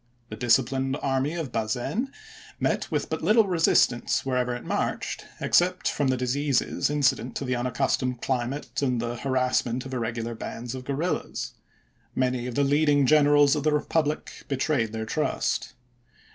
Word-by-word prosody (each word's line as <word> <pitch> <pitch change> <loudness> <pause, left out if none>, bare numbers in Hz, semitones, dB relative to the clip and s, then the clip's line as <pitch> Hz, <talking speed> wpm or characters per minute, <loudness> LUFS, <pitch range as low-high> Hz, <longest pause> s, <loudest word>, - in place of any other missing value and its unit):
The - - -4
disciplined 130 +4 +1
army 135 +3 0
of 160 -7 -4
Bazaine 120 - -2 0.5
met - - 0
with - - -1
but - - -3
little 220 0 +5
resistance 165 -11 +2
wherever 125 -2 0
it 120 - -7
marched - - -2
except 180 +1 +2
from 145 - 0
the 130 -1 +1
diseases 135 +2 0
incident 135 -5 +1
to 140 - -3
the 125 0 0
unaccustomed 125 0 0
climate 130 +4 -2
and 125 -4 +1
the 120 +1 -3
harassment 130 -2 0
of 130 - -7
irregular 115 -1 -2
bands 115 +1 -6
of 130 -1 -7
guerrillas. 145 +7 -2 0.6
Many 125 -1 0
of 125 - -5
the 140 - +3
leading 145 0 +3
generals 145 0 +5
of 150 - -1
the 155 0 +2
republic 150 0 -1
be 135 - -1
trayed 130 -6 0
their 110 0 -4
trust. - - -1
130 Hz, 155 wpm, -26 LUFS, 120-145 Hz, 0.6 s, little